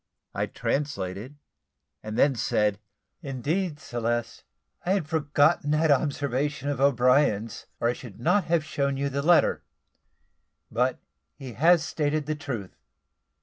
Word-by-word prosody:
I -, -, -1 dB
translated, 120 Hz, -3 st, -3 dB, 0.7 s
and 110 Hz, +1 st, -6 dB
then 140 Hz, -, +4 dB
said 105 Hz, -3 st, 0 dB, 0.4 s
"Indeed, 150 Hz, +4 st, -2 dB
Celeste, 120 Hz, -3 st, -3 dB, 0.4 s
I 185 Hz, -, +1 dB
had 190 Hz, -7 st, -1 dB
forgotten 150 Hz, 0 st, +2 dB
that 155 Hz, +1 st, +3 dB
observation 145 Hz, 0 st, 0 dB
of 140 Hz, -2 st, -2 dB
O'Brien's, 125 Hz, -4 st, +2 dB
or 115 Hz, -, +1 dB
I -, -, +1 dB
should 120 Hz, -5 st, -11 dB
not 200 Hz, -, +2 dB
have 165 Hz, -2 st, +1 dB
shown 140 Hz, -3 st, -1 dB
you 140 Hz, +1 st, -1 dB
the 140 Hz, +1 st, -2 dB
letter; 170 Hz, +3 st, +4 dB, 1.1 s
but 125 Hz, +3 st, +1 dB, 0.4 s
he 130 Hz, -4 st, -9 dB
has 165 Hz, +6 st, +4 dB
stated 150 Hz, -1 st, -1 dB
the 155 Hz, -, -1 dB
truth. 125 Hz, -10 st, -6 dB
140 Hz, 130 wpm, -26 LUFS, 120-150 Hz, 1.1 s, then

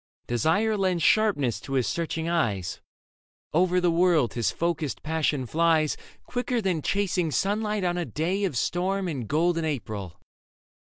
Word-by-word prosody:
Desire 180 Hz, -, +1 dB
lends 185 Hz, -4 st, 0 dB
sharpness 170 Hz, -, +3 dB
to 135 Hz, -, -7 dB
his 130 Hz, -3 st, +2 dB
searching 165 Hz, -1 st, -2 dB
eyes; 110 Hz, -, -1 dB, 0.7 s
Over 180 Hz, +2 st, +3 dB
the 175 Hz, -1 st, +2 dB
world 165 Hz, -6 st, +3 dB
his 120 Hz, -2 st, 0 dB
focused 165 Hz, -4 st, -2 dB
passion 155 Hz, -4 st, 0 dB
flies 160 Hz, +2 st, +2 dB, 0.3 s
Quicker 245 Hz, 0 st, -1 dB
than 185 Hz, -7 st, 0 dB
chasing 185 Hz, -2 st, 0 dB
sunlight 210 Hz, +4 st, 0 dB
on 175 Hz, 0 st, 0 dB
a 175 Hz, -, -1 dB
day 180 Hz, +7 st, -1 dB
Of 145 Hz, -10 st, -2 dB
storm 185 Hz, +7 st, 0 dB
and 135 Hz, -9 st, -4 dB
golden 165 Hz, +4 st, +1 dB
April. 110 Hz, -, -4 dB
170 Hz, 145 wpm, -26 LUFS, 150-185 Hz, 0.7 s, sharpness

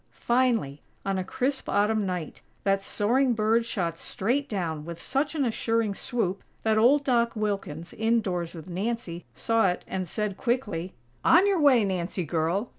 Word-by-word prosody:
Finally, 235 Hz, -, +2 dB, 0.2 s
on 195 Hz, -1 st, 0 dB
a -, -, -1 dB
crisp 265 Hz, +8 st, -2 dB
Autumn 210 Hz, 0 st, +2 dB
night, 180 Hz, -4 st, -4 dB, 0.2 s
that 195 Hz, 0 st, +2 dB
soaring 245 Hz, +6 st, +1 dB
bird 225 Hz, +2 st, +2 dB
shot 170 Hz, -7 st, -2 dB
straight 270 Hz, +8 st, -1 dB
down 165 Hz, -7 st, -2 dB
with 170 Hz, +1 st, -7 dB
such 285 Hz, -, -1 dB
an 285 Hz, -3 st, +1 dB
assuring 225 Hz, -2 st, 0 dB
swoop, 195 Hz, -3 st, -2 dB, 0.2 s
that 220 Hz, -1 st, +3 dB
old 255 Hz, +7 st, +5 dB
Doc 235 Hz, -3 st, +2 dB
Wilkins, 195 Hz, -6 st, -3 dB
indoors 200 Hz, -7 st, 0 dB
with 165 Hz, +1 st, -9 dB
Nancy, 185 Hz, -2 st, -3 dB
saw 225 Hz, -, +2 dB
it 180 Hz, -, -4 dB
and 185 Hz, -3 st, -3 dB
said, 210 Hz, 0 st, -2 dB
quickly: 210 Hz, -8 st, -2 dB, 0.3 s
"On 355 Hz, +4 st, +6 dB
your 395 Hz, -3 st, +2 dB
way, 265 Hz, -7 st, +5 dB
Nancy 180 Hz, -1 st, -2 dB
girl!!" 170 Hz, -, 0 dB
210 Hz, 160 wpm, -27 LUFS, 180-235 Hz, 0.3 s, On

